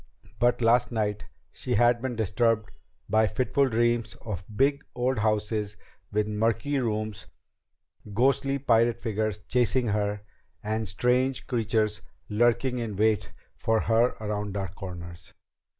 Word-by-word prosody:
But 120 +1 +2
last 120 +2 +4
night 105 -3 -1 0.3
she 125 - -3
had 120 0 +4
been 130 -1 -3
disturbed 110 +1 +1 0.4
by 110 +1 +3
fitful 130 +5 +1
dreams 120 -1 +1
of 100 -5 -5
big 140 +3 +2
old 125 0 0
houses 105 -1 -1 0.3
with 105 0 +1
murky 115 +7 0
rooms, 110 -4 -3 0.8
ghostly 135 +5 +2
pirate 115 -3 +2
figures 110 -3 -1
chasing 125 -1 +2
her, 105 0 -1 0.4
and 110 -1 -2
strange 125 +5 +1
creatures 110 -3 0 0.3
lurking 120 +3 +2
in 110 -4 -4
wait 110 +1 +1 0.2
for 110 0 +1
her 115 +2 +2
around 105 -2 -3
dark 95 -3 -3
corners. 85 -3 -9
110 Hz, 125 wpm, -27 LUFS, 105-120 Hz, 0.8 s, last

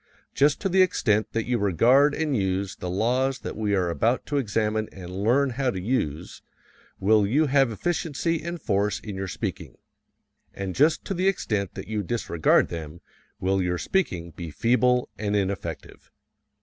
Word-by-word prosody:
Just 145 +1 +3
to 195 - 0
the 190 0 +4
extent 110 - +2
that 115 -1 -1
you 120 -1 0
regard 125 - +4
and 155 -3 -1
use 95 -2 -1
the 90 - -6
laws 125 +8 +1
that - - -6
we 105 -2 0
are 90 -2 +1
about 115 - 0
to 145 - -2
examine 110 -3 0
and 90 -2 -9
learn 125 +8 +2
how 130 +1 0
to 95 - -3
use 90 - -2 0.6
will 105 +1 +3
you 145 +9 +3
have 135 -2 +3
efficiency 165 +4 -1
and 170 +1 -5
force 105 -5 0
in 105 -3 -7
your 95 0 -4
speaking; 90 - -5 0.8
and 95 -2 -4
just 155 - +2
to 195 - -2
the 185 +1 0
extent 105 - -1
that - - -7
you 110 -1 -2
disregard 90 -6 +1
them 80 0 -7 0.4
will 95 +1 +1
your 90 -1 0
speaking 90 - -1
be 85 0 -7
feeble 125 - +2
and 105 -1 -1
ineffective. 100 -1 -4
110 Hz, 170 wpm, -25 LUFS, 95-135 Hz, 0.8 s, the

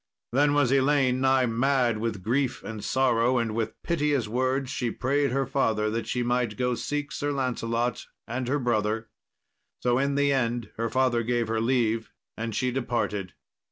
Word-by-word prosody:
Then 145 +3 +3
was 145 -4 +3
Elaine 135 -2 +3
nigh 130 -1 +4
mad 120 -1 +1
with 110 -4 -3
grief 130 +4 0
and 110 -2 -6
sorrow, 125 -1 +2
and 115 -2 0
with 115 0 -3
piteous 150 -8 0
words 130 +3 0
she 120 - -1
prayed 140 +4 0
her 135 +2 0
father 110 -5 0
that 115 +1 -3
she 125 - -1
might 120 -3 0
go 125 0 +1
seek 145 +4 -3
Sir 145 0 -2
Lancelot 120 -3 -1 0.2
and 120 +2 -3
her 140 +3 +1
brother. 110 -3 0 0.7
So 125 0 +3
in 140 +1 +1
the 140 0 +3
end 120 -4 -1
her 115 0 -1
father 130 -2 +2
gave 120 -1 0
her 110 0 0
leave, 115 -2 +1 0.2
and 115 -1 -4
she 125 +1 0
departed. 115 -7 -2
125 Hz, 170 wpm, -27 LUFS, 115-135 Hz, 0.7 s, nigh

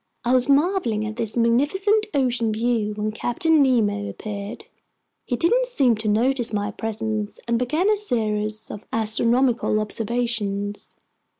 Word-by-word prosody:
I 245 - +2
was 255 +1 +2
marveling 280 - +2
at 215 +1 -6
this 230 -1 -3
magnificent 380 - +2
ocean 245 -4 +1
view 220 -1 -1
when 215 0 -2
Captain 290 +8 +1
Nemo 210 -6 +1
appeared. 205 0 -7 0.6
He 245 - 0
didn't 485 - +2
seem 275 - +3
to 215 0 -4
notice 240 +3 +2
my 205 0 -1
presence 220 -1 -4
and 235 0 +1
began 305 +10 0
a 425 0 +3
series 215 - -2
of 210 - -8
astronomical 230 +1 +2
observations. 215 -2 -2
230 Hz, 135 wpm, -23 LUFS, 215-260 Hz, 0.6 s, seem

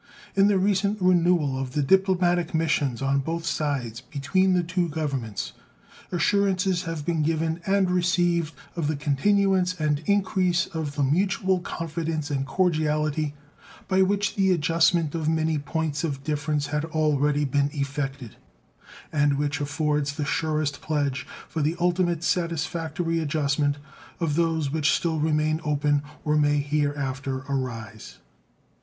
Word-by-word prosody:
In 195 0 +5
the 205 -1 +3
recent 200 +2 +1
renewal 175 -6 +3
of 130 -1 -4
the 145 - +1
diplomatic 175 0 +2
missions 145 -6 0
on 135 0 +2
both 165 +4 -3
sides 140 -7 -2
between 160 +9 +1
the 180 - +2
two 175 0 -1
Governments 140 -9 -3 0.6
assurances 185 +1 +1
have 165 -3 -4
been 165 -2 0
given 160 +2 0
and 195 -1 +2
received 175 -2 +1 0.2
of 165 -4 -1
the 155 - 0
continuance 180 +5 +1
and 150 -2 +1
increase 185 -3 +2
of 155 -3 -5
the 145 - +1
mutual 190 +5 +1
confidence 165 -3 -4
and 135 -1 -1
cordiality 155 -3 0 0.5
by 190 0 +3
which 200 +1 +1
the 195 -1 +2
adjustment 165 -1 +2
of 160 -2 -1
many 160 -1 +1
points 150 +1 -2
of 140 -4 -3
difference 150 -1 -1
had 150 0 0
already 150 -2 +1
been 140 +1 +1
effected, 140 -4 -4 0.7
and 145 -2 +2
which 145 +1 -1
affords 145 0 0
the 145 0 -3
surest 150 -1 -1
pledge 145 -3 -1 0.2
for 160 - -3
the 155 +3 +1
ultimate 175 -1 +1
satisfactory 165 -1 -1
adjustment 145 -2 0 0.4
of 160 -4 0
those 160 -4 +1
which 150 -1 +2
still 160 -2 0
remain 155 +1 +1
open 145 -1 +1 0.2
or 150 0 +2
may 145 0 +3
hereafter 140 -2 -1
arise. 115 -5 -5
155 Hz, 135 wpm, -25 LUFS, 145-175 Hz, 0.7 s, In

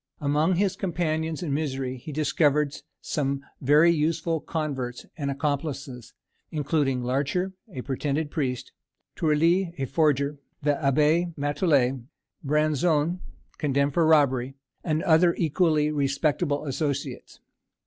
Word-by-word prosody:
Among 150 +5 +2
his 190 +1 +1
companions 165 -3 -2
in 150 -5 -2
misery 135 -3 -2
he 130 +5 -9
discovered 150 0 +1 0.3
some 140 -2 -2 0.2
very 150 +5 +5
useful 165 +1 0
converts 135 -6 -4
or 145 -4 -3
accomplices, 140 -3 -3 0.3
including 145 -4 0
Larcher, 140 +9 -1 0.2
a 130 - -5
pretended 145 +2 -2
priest; 130 -5 -2 0.4
Tourly, 170 +3 +2
a 135 - -1
forger; 145 0 +1 0.2
the 145 0 +3
Abbé 155 +4 +2
Matouillet; 145 -4 +1 0.4
Branzon, 155 +3 +1 0.4
condemned 140 -1 +1
for 165 0 +3
robbery; 135 -4 +3 0.3
and 155 -1 0
other 170 +1 +4
equally 155 -2 +2
respectable 145 +1 0
associates. 140 0 -3
150 Hz, 110 wpm, -26 LUFS, 140-160 Hz, 0.4 s, very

